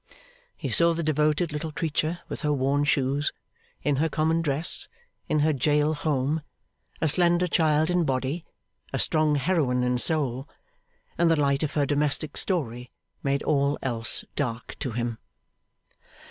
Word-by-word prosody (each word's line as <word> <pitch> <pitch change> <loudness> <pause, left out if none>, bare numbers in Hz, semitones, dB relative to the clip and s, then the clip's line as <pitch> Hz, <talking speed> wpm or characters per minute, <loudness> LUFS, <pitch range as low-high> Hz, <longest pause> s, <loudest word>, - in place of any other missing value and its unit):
He - - -4
saw 170 0 +4
the 170 - -2
devoted 155 +2 +1
little 155 +1 -4
creature 160 +2 -2
with - - -6
her 150 -2 0
worn 140 +1 +1
shoes, 140 0 +1 0.5
in 145 -2 +1
her 160 +3 +1
common 160 +2 +1
dress, 155 +2 -1 0.4
in 150 - +2
her 155 +1 +3
jail 150 +3 +2
home; 145 0 -1 0.6
a 160 - +2
slender 175 +2 +3
child 160 -1 +2
in 180 -1 +2
body, 135 +3 -1 0.5
a - - -2
strong 155 -1 +3
heroine 140 -4 +1
in 125 0 +1
soul; 135 -3 +1 0.7
and 170 -1 +4
the 165 -2 +3
light 140 -1 +2
of 155 - -2
her 145 -2 +2
domestic 145 +2 +1
story 125 - -2 0.3
made 140 0 0
all 140 -1 +1
else 120 -3 +1
dark 120 -5 -3
to 130 - -3
him. 120 -1 -3
150 Hz, 150 wpm, -26 LUFS, 135-160 Hz, 0.7 s, saw